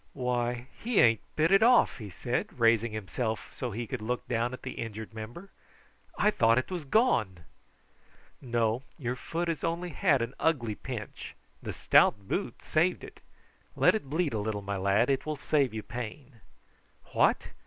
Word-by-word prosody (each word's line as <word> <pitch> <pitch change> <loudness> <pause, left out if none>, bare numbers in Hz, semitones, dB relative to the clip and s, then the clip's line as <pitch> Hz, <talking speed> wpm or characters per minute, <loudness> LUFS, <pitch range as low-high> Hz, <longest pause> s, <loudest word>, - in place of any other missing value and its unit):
"Why, 125 -1 -1
he 235 -1 +1
ain't 115 -3 +5 0.2
bit 160 +3 +2
it 195 +1 +6
off!" 240 - +5
he 105 -3 -7
said, 120 +8 -3
raising 115 0 +4
himself 110 +2 -3
so 125 - -4
that 110 - -7
he 120 - -2
could 125 0 -5
look 125 +3 -3
down 120 0 0
at 130 - -9
the - - -4
injured 110 -1 -6
member. 115 - -8 0.7
"I 210 - +4
thought 115 - +3
it 130 - -1
was 175 -5 -4
gone." 120 - +2 1.0
"No; 120 -2 0 0.2
your 125 -5 -3
foot 170 +6 -3
has 165 -4 -2
only 170 +2 -1
had 150 -6 +2
an 115 +3 -5
ugly 125 -9 +1
pinch; 110 -1 -7 0.3
the - - -5
stout 100 -2 +3
boot 195 - -3
saved 170 +4 +1
it. - - -11 0.6
Let - - +5
it 215 -11 -3
bleed 160 -1 0
a 110 - -1
little, 105 -1 -3
my 100 +1 -3
lad; 100 +6 +2
it 135 +2 -1
will 155 - -1
save 140 -2 +1
you 110 -1 -5
pain." 120 0 -8 0.7
"What! - - +2
120 Hz, 175 wpm, -29 LUFS, 110-155 Hz, 1.0 s, it